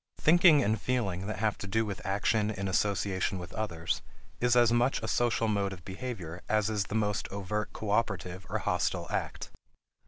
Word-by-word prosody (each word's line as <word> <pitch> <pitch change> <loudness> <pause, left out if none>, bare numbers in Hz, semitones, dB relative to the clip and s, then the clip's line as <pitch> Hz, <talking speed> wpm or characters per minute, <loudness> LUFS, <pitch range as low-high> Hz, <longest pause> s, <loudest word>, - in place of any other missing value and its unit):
Thinking 160 -2 +6
and 110 0 0
feeling 100 -7 -1
that 110 - -3
have 110 0 0
to 100 - -5
do 110 +3 +1
with 100 -2 -5
action 105 +2 +1
in 100 -2 -3
association 95 0 0
with 90 -1 -8
others 85 -7 -2 0.4
is 125 0 +3
as 120 -1 +5
much 120 +3 +2
a - - -2
social 115 -2 +1
mode 100 -2 0
of 90 -3 -12
behavior 95 -5 -6
as 110 0 +2
is 105 -2 0
the 105 - -5
most 105 -2 0
overt 100 +2 -3
cooperative 100 -4 -2
or - - 0
hostile - - 0
act. - - -3
105 Hz, 180 wpm, -30 LUFS, 95-115 Hz, 0.4 s, Thinking